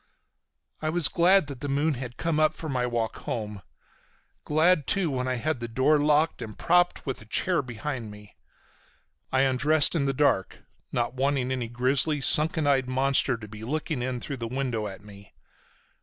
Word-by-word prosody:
I 155 Hz, -, -1 dB
was 170 Hz, 0 st, +3 dB
glad 185 Hz, +1 st, +4 dB
the 140 Hz, 0 st, -6 dB
moon 145 Hz, +3 st, +1 dB
had 125 Hz, -2 st, -7 dB
come 165 Hz, -2 st, -1 dB
up 155 Hz, 0 st, +3 dB
for 160 Hz, -, -7 dB
my 125 Hz, -4 st, -1 dB
walk 115 Hz, -2 st, -2 dB
home, 105 Hz, -3 st, -5 dB, 0.8 s
glad 155 Hz, -1 st, +3 dB
too 190 Hz, -6 st, +1 dB
when 130 Hz, -1 st, -2 dB
I 130 Hz, -, 0 dB
had 145 Hz, +2 st, -2 dB
the 120 Hz, -, -4 dB
door 130 Hz, +6 st, +2 dB
locked 150 Hz, 0 st, +2 dB
and 110 Hz, -2 st, -7 dB
propped 175 Hz, +1 st, +2 dB
with 135 Hz, -5 st, -4 dB
a -, -, -13 dB
chair 175 Hz, +9 st, +1 dB
behind 125 Hz, -1 st, -5 dB
me. 105 Hz, 0 st, -14 dB, 1.0 s
I 130 Hz, -, +3 dB
undressed 145 Hz, +3 st, +3 dB
in 155 Hz, -5 st, 0 dB
the 135 Hz, -, 0 dB
dark, 135 Hz, -9 st, +1 dB, 0.3 s
not 120 Hz, -1 st, -1 dB
wanting 130 Hz, -1 st, 0 dB
any 125 Hz, -3 st, -2 dB
grisly, 130 Hz, +5 st, +1 dB
sunken 155 Hz, +3 st, +2 dB
eyed 135 Hz, -3 st, +2 dB
monster 135 Hz, -1 st, +2 dB
to 110 Hz, -1 st, -10 dB
be 105 Hz, +1 st, -10 dB
looking 150 Hz, +2 st, -3 dB
in 125 Hz, 0 st, -2 dB
through 140 Hz, +3 st, -6 dB
the 115 Hz, -1 st, -4 dB
window 125 Hz, -4 st, -2 dB
at 95 Hz, -1 st, -9 dB
me. 100 Hz, -1 st, -15 dB
135 Hz, 180 wpm, -26 LUFS, 120-150 Hz, 1.0 s, glad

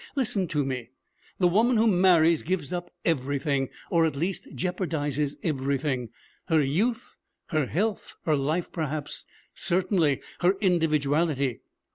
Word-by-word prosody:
Listen 215 Hz, -8 st, 0 dB
to 150 Hz, -3 st, 0 dB
me. 125 Hz, -3 st, -4 dB, 0.5 s
The 180 Hz, -, +4 dB
woman 225 Hz, +7 st, +3 dB
who 220 Hz, -, +4 dB
marries 175 Hz, -5 st, +5 dB
gives 180 Hz, -2 st, -2 dB
up 175 Hz, 0 st, -4 dB, 0.2 s
everything, 140 Hz, -2 st, 0 dB, 0.2 s
or 170 Hz, -1 st, +4 dB
at 160 Hz, -3 st, +1 dB
least 175 Hz, +7 st, -2 dB
jeopardizes 150 Hz, -6 st, -1 dB
everything: 135 Hz, -4 st, -1 dB, 0.4 s
her 160 Hz, -1 st, +3 dB
youth, 220 Hz, -, -1 dB, 0.3 s
her 155 Hz, -5 st, +1 dB
health, 205 Hz, -, -2 dB
her 155 Hz, -, +2 dB
life 155 Hz, +5 st, -1 dB
perhaps, 155 Hz, -3 st, -4 dB, 0.3 s
certainly 175 Hz, -6 st, +1 dB, 0.2 s
her 180 Hz, +2 st, +4 dB
individuality. 155 Hz, -, +1 dB
160 Hz, 125 wpm, -27 LUFS, 140-185 Hz, 0.5 s, marries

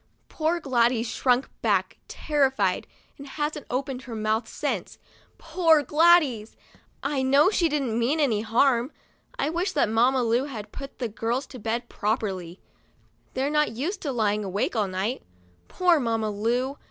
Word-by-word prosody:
Poor 325 Hz, +2 st, 0 dB
Gladys 240 Hz, -5 st, +1 dB
shrunk 250 Hz, +2 st, +1 dB
back, -, -, 0 dB
terrified, 265 Hz, -11 st, 0 dB, 0.3 s
and 280 Hz, -, -9 dB
hasn't 295 Hz, +1 st, -4 dB
opened 260 Hz, 0 st, -3 dB
her 240 Hz, -3 st, -8 dB
mouth 215 Hz, +1 st, -1 dB
since. -, -, -4 dB, 0.4 s
Poor 325 Hz, -2 st, +3 dB
Gladys! 300 Hz, -9 st, +3 dB, 0.5 s
I 275 Hz, -1 st, 0 dB
know 280 Hz, +7 st, +4 dB
she 340 Hz, -5 st, +2 dB
didn't 270 Hz, -6 st, -1 dB
mean 265 Hz, +7 st, +1 dB
any 235 Hz, -8 st, +2 dB
harm. 235 Hz, +3 st, +2 dB, 0.5 s
1 300 Hz, +3 st, -1 dB
wish 350 Hz, +4 st, -1 dB
that 280 Hz, -, +2 dB
Mamma 245 Hz, +4 st, +3 dB
Lu 235 Hz, +3 st, +1 dB
had 225 Hz, -7 st, -8 dB
put 275 Hz, -1 st, -9 dB
the 245 Hz, -, -2 dB
girls 230 Hz, +5 st, -2 dB
to 255 Hz, -, -11 dB
bed 230 Hz, +3 st, -3 dB
properly. 195 Hz, -6 st, -3 dB, 0.8 s
They're 270 Hz, +3 st, 0 dB
not 300 Hz, -6 st, +1 dB
used 325 Hz, -, -3 dB
to 285 Hz, -, -2 dB
lying 210 Hz, -3 st, 0 dB
awake 200 Hz, +4 st, -2 dB
all 210 Hz, -3 st, +1 dB
night. 190 Hz, +7 st, -2 dB, 0.5 s
Poor 355 Hz, -3 st, +3 dB
Mamma 225 Hz, -4 st, -1 dB
Lu 245 Hz, +7 st, -1 dB
255 Hz, 155 wpm, -25 LUFS, 225-290 Hz, 0.8 s, know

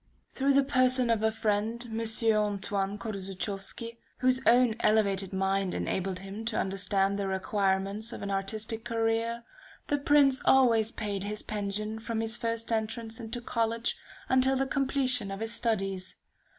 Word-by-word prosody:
Through 275 Hz, +1 st, +1 dB
the 280 Hz, -, +5 dB
person 255 Hz, -3 st, +3 dB
of 225 Hz, -2 st, +1 dB
a 220 Hz, 0 st, +2 dB
friend, 220 Hz, +2 st, -1 dB
M. 225 Hz, -1 st, -4 dB, 0.3 s
Antoine 205 Hz, -1 st, -1 dB
Korzuchowski, 200 Hz, +2 st, -4 dB, 0.2 s
whose 255 Hz, 0 st, +2 dB
own 245 Hz, -1 st, +5 dB
elevated 200 Hz, -3 st, +2 dB
mind 195 Hz, 0 st, 0 dB
enabled 190 Hz, 0 st, -2 dB
him 195 Hz, +3 st, -7 dB
to 225 Hz, -1 st, -1 dB
understand 195 Hz, +1 st, 0 dB
the 200 Hz, -, -1 dB
requirements 195 Hz, +2 st, -1 dB
of -, -, -7 dB
an 200 Hz, -, -3 dB
artistic 215 Hz, +3 st, -2 dB
career, 230 Hz, 0 st, -1 dB, 0.5 s
the 290 Hz, -, +1 dB
Prince 280 Hz, -2 st, +4 dB
always 230 Hz, -5 st, +4 dB
paid 205 Hz, -3 st, -4 dB
his 210 Hz, +1 st, -4 dB
pension 210 Hz, +1 st, -3 dB
from 225 Hz, 0 st, -3 dB
his 225 Hz, 0 st, +1 dB
first 230 Hz, 0 st, -2 dB
entrance 225 Hz, +1 st, -2 dB
into 230 Hz, +1 st, -5 dB
college, 230 Hz, 0 st, -1 dB, 0.3 s
until 260 Hz, +1 st, +3 dB
the 270 Hz, +1 st, +1 dB
completion 265 Hz, -5 st, +2 dB
of 195 Hz, 0 st, -5 dB
his 225 Hz, +1 st, -2 dB
studies. 195 Hz, -5 st, -2 dB
220 Hz, 150 wpm, -29 LUFS, 200-235 Hz, 0.5 s, the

